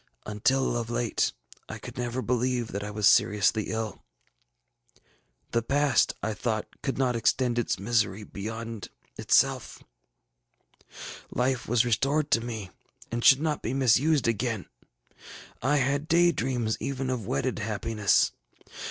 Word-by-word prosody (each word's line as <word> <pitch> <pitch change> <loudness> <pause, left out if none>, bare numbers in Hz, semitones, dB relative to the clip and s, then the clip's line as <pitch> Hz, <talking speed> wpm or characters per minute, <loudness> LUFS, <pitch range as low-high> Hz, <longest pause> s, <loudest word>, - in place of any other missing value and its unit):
ŌĆ£Until 120 +3 +1
of 115 - -7
late, 120 -1 0 0.4
I - - -6 0.2
never 120 +1 -3
could - - -8
believe 125 -1 0
that 100 +1 -4
I 105 - -5
was 105 -1 +2
seriously 105 0 +3
ill: 110 -2 -4 1.5
the 115 - +1
past, 140 +1 +2
I 110 - -1
thought, 110 0 -2 0.2
could 135 - -2
not 130 -2 +1
extend 120 +1 +1
its 120 - -1
misery 105 0 0
beyond 110 +1 -6 0.3
itself; - - +1 1.5
life 125 0 -1
was 120 +1 +3
restored 140 +6 +1
to 115 - +4
me, 110 -6 -6 0.4
and 120 0 -2
should 135 +1 +7
not 155 -2 -1
be 120 +4 -3
missed 135 +3 +3
again. 115 -2 -1 1.0
I 140 +5 +2
had 140 +3 0
day 170 +1 +5
dreams 120 -6 -1
even 135 -1 -3
of 115 -6 -3
wedded 130 -1 -1
happiness. 105 -1 +1
120 Hz, 135 wpm, -27 LUFS, 110-130 Hz, 1.5 s, should